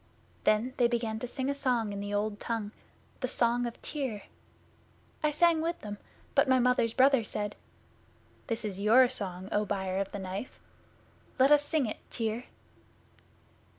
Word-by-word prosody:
Then 220 +4 +2
they 245 - +5
began 230 -2 -1
to 245 - -4
sing 260 +2 -3
a 280 - +1
song 245 -6 0
in 200 - -4
the 205 0 -4
Old 205 0 -1
Tongue 225 -3 -3 0.5
The 255 - -1
Song 240 -1 +1
of 235 - -8
Tyr. 255 -9 -3 1.0
I 305 - +3
sang 325 +1 +3
with 335 +1 -2
them, 205 -1 -7 0.3
but 270 - +4
my 260 - +5
Mother's 245 -2 +2
brother 265 -2 +5
said, 205 0 -3 0.9
"This 230 -2 -2
is 195 -2 -4
your 240 +5 +6
song, 185 -3 -2
O 210 - +2
Buyer 190 -2 -2
of 195 0 -2
the - - -5
Knife. 190 +5 -6 0.8
Let 265 +2 +5
us 295 -1 +6
sing 295 -2 +1
it, 215 - -4
Tyr." 225 +1 -2
230 Hz, 165 wpm, -30 LUFS, 205-260 Hz, 1.0 s, your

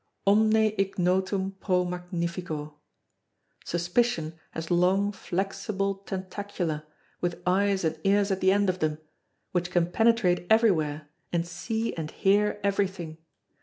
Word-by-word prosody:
Omne 215 +1 +4
ignotum 190 0 +1
pro 180 -2 +1
magnifico. 170 -4 -4 0.8
Suspicion 175 -1 0 0.2
has 160 +2 -6
long 185 +4 +3
flexible 195 +1 -2
tentacula, 190 -4 -4 0.3
with 175 -1 -1
eyes 195 +1 +2
and 160 -1 -1
ears 200 +1 +3
at 190 - -1
the 190 - +5
end 200 0 +3
of 185 0 0
them, 155 -2 0 0.5
which 180 0 0
can 175 -1 +1
penetrate 220 -5 +3
everywhere 155 -10 +3 0.2
and 170 -1 0
see 220 +6 -2
and 160 -2 -4
hear 205 +2 +2
everything. 190 -5 -1
185 Hz, 120 wpm, -27 LUFS, 175-200 Hz, 0.8 s, the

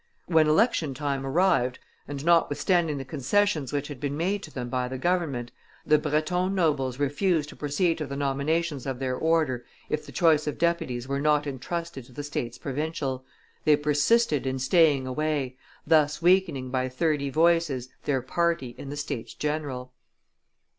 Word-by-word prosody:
When 160 -3 +4
election 155 - +2
time 140 -2 -2
arrived, 135 -5 +2 0.3
and 140 +1 -6
notwithstanding 170 -1 +2
the 135 - -5
concessions 150 +2 0
which 145 -1 -2
had 145 -4 -8
been 145 +1 -3
made 190 +5 0
to 160 - -10
them 125 -3 -5
by 125 0 -1
the 130 +1 -5
government, 145 -7 -1 0.3
the 150 -1 +4
Breton 180 +6 0
nobles 145 -8 +1
refused 150 +3 +1
to - - -11
proceed 160 +4 0
to 155 - -3
the 140 - -5
nominations 140 +1 -1
of 135 -2 -2
their 130 -1 -2
order 155 -6 +1 0.3
if 150 - -1
the - - -11
choice 155 -4 +3
of 150 - -2
deputies 130 -8 -1
were 140 +1 -1
not 150 0 +3
intrusted 145 +2 -4
to 125 - -17
the 145 - -6
states 125 -4 -4
provincial; 135 -2 -3 0.4
they 150 - +5
persisted 150 - +2
in 130 0 -1
staying 145 0 +3
away, 140 -1 -1 0.3
thus 150 -1 +3
weakening 170 -7 +2
by 130 0 0
thirty 140 +1 0
voices 160 -4 +2 0.2
their 135 -4 0
party 165 -3 0
in 135 - -7
the 145 - -5
States 145 -6 -5
general. 145 -4 -3
145 Hz, 165 wpm, -26 LUFS, 130-165 Hz, 0.4 s, they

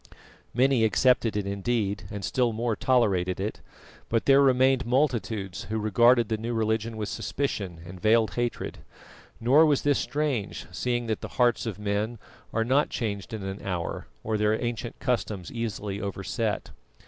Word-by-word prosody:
Many 130 0 +3
accepted 115 0 +3
it 105 - -1
indeed, 100 +1 -1
and 100 -3 -5
still 125 -3 +1
more 115 0 -1
tolerated 100 -10 +2
it; 105 +3 -3 0.5
but 115 -1 +1
there 140 0 +6
remained 130 -1 +4
multitudes 115 - -1
who 110 - -3
regarded 120 +3 +4
the 110 - -1
new 115 +2 -3
religion 110 0 0
with 105 -1 -3
suspicion 100 -5 -3
and 90 +1 -10
veiled 110 0 +3
hatred. 120 -1 -3 0.6
Nor 130 +7 +5
was 145 -3 +2
this 145 -1 +3
strange, 145 -8 -2
seeing 120 -1 -1
that 110 -2 -2
the - - -5
hearts 120 -2 +3
of 105 - -4
men 105 +3 -2 0.3
are 115 0 0
not 135 +5 +3
changed 105 -3 -3
in 110 -3 -5
an 95 +1 -5
hour 90 -3 -3 0.2
or 110 -1 -1
their 105 +1 +2
ancient 120 -1 -4
customs 110 -8 -2
easily 105 -3 -4
overset. 100 +2 -3
115 Hz, 160 wpm, -27 LUFS, 105-125 Hz, 0.6 s, there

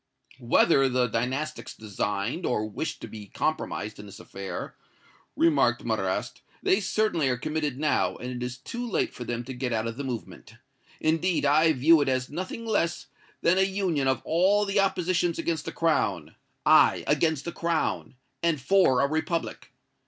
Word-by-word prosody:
"Whether 135 +3 +4
the 125 0 +2
Dynastics 130 +7 -3
designed 105 - -3
or 110 -7 0
wished 110 +9 -5
to - - -6
be 105 -2 -10
compromised 105 -7 -3
in 105 - -9
this 100 - -11
affair," 95 0 -7 0.6
remarked 140 -8 +2
Marrast, 100 -5 -2 0.2
"they 190 - +3
certainly 190 -8 +1
are 125 - 0
committed 150 0 -2
now, 150 +1 +1
and 125 +1 -6
it 125 -1 -5
is 125 0 -4
too 240 - -6
late - - 0
for 125 - -7
them 120 0 -3
to 130 +2 -7
get 125 0 -3
out 110 -1 0
of 115 0 -4
the 140 - -4
movement. 110 -4 -7 0.4
Indeed, 165 +1 +1
I 155 +3 +5
view 155 +4 +5
it 140 - +1
as 130 0 -1
nothing 185 +8 -5
less 170 -6 -1 0.3
than 185 +3 +4
a - - +5
union 190 -7 0
of 130 -2 0
all 190 +5 +3
the 200 0 +1
oppositions 180 -3 +1
against 165 -2 -2
the - - -4
Crown 100 - 0 0.3
aye, - - +5
against 160 -4 +1
the 170 - -3
Crown, 170 -5 -2 0.3
and 170 -3 +1
for 130 -3 +3
a 140 - +3
republic! 160 +3 -3
140 Hz, 170 wpm, -27 LUFS, 120-170 Hz, 0.6 s, I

